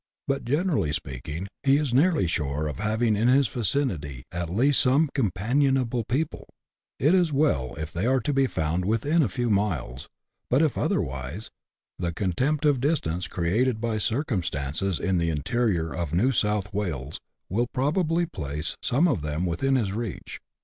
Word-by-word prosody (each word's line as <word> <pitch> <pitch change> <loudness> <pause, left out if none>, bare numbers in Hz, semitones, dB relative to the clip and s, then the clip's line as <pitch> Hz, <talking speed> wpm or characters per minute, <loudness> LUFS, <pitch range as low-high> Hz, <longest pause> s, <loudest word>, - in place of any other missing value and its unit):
But, 140 0 -1
generally 145 - +1
speaking, 75 +3 -5
he 135 0 +4
is 145 -5 -1
nearly 155 - +3
sure 75 -3 -1
of 75 - -5
having 110 +1 +1
in 110 +4 +2
his 135 +1 +4
vicinity 90 - -1
at 85 -1 -3
least 130 +10 +3
some 140 +3 +3
companion 130 +5 +1
able 120 -2 -1
people; 145 +8 -2 0.5
it 150 +6 +3
is 180 -4 +3
well 70 - +1
if 80 +1 -6
they 90 +7 -1
are 130 +1 +3
to 145 +6 -1
be 135 -1 +3
found 80 -2 -1
within 115 - +2
a 130 - +2
few 120 +6 -2
miles, 85 -11 -1 0.4
but, 135 +6 +4
if 155 -6 +1
otherwise, 65 +10 -2 0.5
the 85 -2 -1
contempt 130 - 0
of 145 -4 +3
distance 95 - 0
created 110 +8 0
by 115 -1 -1
circum 115 -2 0
stances 80 +3 -2
in 95 -2 +1
the 85 0 +1
interior 80 - 0
of 85 0 -3
New 120 +9 +3
South 105 -5 0
Wales 80 -9 -3 0.3
will 115 +6 0
probably 165 +5 +1
place 75 - -4
some 145 +9 +2
of 130 - 0
them 75 +4 -2
within 110 +11 +1
his 105 -7 0
reach. 115 -2 -5
110 Hz, 170 wpm, -26 LUFS, 85-135 Hz, 0.5 s, he